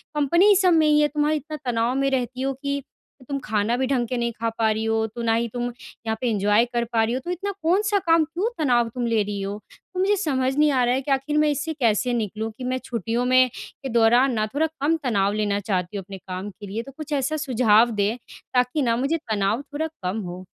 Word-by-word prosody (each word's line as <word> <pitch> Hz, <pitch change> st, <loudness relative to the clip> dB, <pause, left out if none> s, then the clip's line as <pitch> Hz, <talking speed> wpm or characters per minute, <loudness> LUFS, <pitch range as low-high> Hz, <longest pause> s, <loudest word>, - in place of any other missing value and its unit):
Company 340 Hz, +8 st, +4 dB
सब 365 Hz, -2 st, +4 dB
में 315 Hz, -1 st, +4 dB
ही 300 Hz, 0 st, +4 dB
है। 295 Hz, -, +4 dB
तुम्हारा 300 Hz, +1 st, 0 dB
इतना 305 Hz, +1 st, -5 dB
तनाव 230 Hz, +2 st, +1 dB
में 275 Hz, 0 st, +1 dB
रहती 255 Hz, 0 st, -2 dB
हो 270 Hz, 0 st, 0 dB
कि 280 Hz, 0 st, -2 dB, 0.5 s
तुम 280 Hz, -, -1 dB
खाना 215 Hz, +2 st, 0 dB
भी 265 Hz, -, +1 dB
ढंग 250 Hz, -4 st, 0 dB
के 250 Hz, -, -2 dB
नहीं 235 Hz, 0 st, -1 dB
ख़ा 230 Hz, 0 st, 0 dB
पा 220 Hz, -1 st, +2 dB
रही 220 Hz, +1 st, -1 dB
हो 225 Hz, 0 st, +1 dB
तो 235 Hz, +2 st, -8 dB
ना 225 Hz, -1 st, +2 dB
ही 235 Hz, +1 st, +1 dB
तुम 240 Hz, 0 st, -2 dB
यहाँ 230 Hz, -2 st, -6 dB
पे 245 Hz, -, +1 dB
एन्जॉय 210 Hz, +2 st, +3 dB
कर 235 Hz, 0 st, +1 dB
पा 225 Hz, -1 st, +3 dB
रही 230 Hz, +2 st, 0 dB
हो 255 Hz, -, -1 dB
तो 355 Hz, -, -2 dB
इतना 400 Hz, +3 st, -3 dB
कौन-सा 405 Hz, +4 st, +2 dB
काम? 330 Hz, -2 st, +3 dB
क्यों 345 Hz, +9 st, -2 dB
तनाव 240 Hz, -5 st, +2 dB
तुम 245 Hz, +1 st, -3 dB
ले 225 Hz, -2 st, +2 dB
रही 200 Hz, -1 st, -4 dB
हो? 200 Hz, +1 st, -4 dB, 0.4 s
तो 365 Hz, -, -4 dB
मुझे 405 Hz, +2 st, +3 dB
समझ 265 Hz, -3 st, 0 dB
नहीं 300 Hz, -1 st, +4 dB
आ 255 Hz, -2 st, +2 dB
रहा 245 Hz, +1 st, +2 dB
है 265 Hz, -, -1 dB
कि 275 Hz, -, -4 dB
आख़िर 275 Hz, +3 st, 0 dB
मैं 305 Hz, 0 st, +4 dB
इससे 300 Hz, +3 st, -2 dB
कैसे 245 Hz, -2 st, +1 dB
निकलूँ 220 Hz, 0 st, -2 dB
कि 255 Hz, -, -7 dB
मैं 255 Hz, +1 st, -1 dB
छुट्टियों 235 Hz, +1 st, -2 dB
में 255 Hz, 0 st, +5 dB
के 270 Hz, -, -9 dB
दौरान 240 Hz, +3 st, +4 dB
ना 215 Hz, -1 st, 0 dB
थोड़ा 320 Hz, +2 st, +2 dB
कम 315 Hz, +1 st, -1 dB
तनाव 200 Hz, -5 st, +1 dB
लेना 205 Hz, -1 st, 0 dB
चाहती 190 Hz, -1 st, -2 dB
हूँ 195 Hz, -, -5 dB
अपने 195 Hz, +1 st, -9 dB
काम 185 Hz, +2 st, -6 dB
के 205 Hz, +1 st, -11 dB
लिए। 215 Hz, +4 st, -3 dB
तो 275 Hz, -, -11 dB
कुछ 305 Hz, -1 st, -5 dB
ऐसा 285 Hz, +3 st, 0 dB
सुझाव 240 Hz, -5 st, +3 dB
दें 210 Hz, +4 st, +1 dB, 0.4 s
ताकि 250 Hz, +4 st, +2 dB
ना 230 Hz, -3 st, +2 dB
मुझे 280 Hz, +6 st, 0 dB
तनाव 220 Hz, -3 st, -1 dB
थोड़ा 295 Hz, +3 st, -4 dB, 0.2 s
कम 185 Hz, +5 st, -1 dB
हो। 180 Hz, +1 st, -8 dB
250 Hz, 250 wpm, -23 LUFS, 220-295 Hz, 0.5 s, में